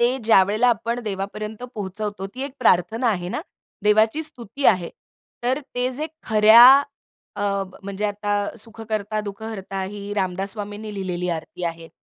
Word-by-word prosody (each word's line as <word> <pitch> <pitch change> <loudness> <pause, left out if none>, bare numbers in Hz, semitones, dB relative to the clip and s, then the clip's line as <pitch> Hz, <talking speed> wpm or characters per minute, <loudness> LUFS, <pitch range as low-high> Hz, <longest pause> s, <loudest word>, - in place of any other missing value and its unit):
ते 240 +2 +3
ज्यावेळेला 215 +2 +4
आपण 235 +1 0
देवापर्यंत 210 +2 -5
पोहचवतो 205 -1 -4
ती 260 - -5
एक 275 -1 -5
प्रार्थना 225 +2 +3
आहे 175 -3 -2
ना? - - -3 0.4
देवाची 220 +7 +3
स्तुती 275 -3 -7
आहे. 185 -6 +3 0.5
तर 255 +3 +1 0.2
ते 250 +1 0
जे 300 +5 -3 0.2
खऱ्या 220 +2 +8 0.7
अ, - - -3 0.4
म्हणजे 200 +1 -4
आता, 205 0 -2
सुख 225 +2 -11
कर्ता 215 0 -1
दुःख 205 0 -8
हर्ता 195 -3 -5
ही 200 +1 -6
रामदास 190 0 -2
स्वामींनी 210 0 -6
लिहिलेली 180 -2 -3
आरती 170 +1 -5
आहे. 165 -1 -5
210 Hz, 150 wpm, -23 LUFS, 195-225 Hz, 0.7 s, खऱ्या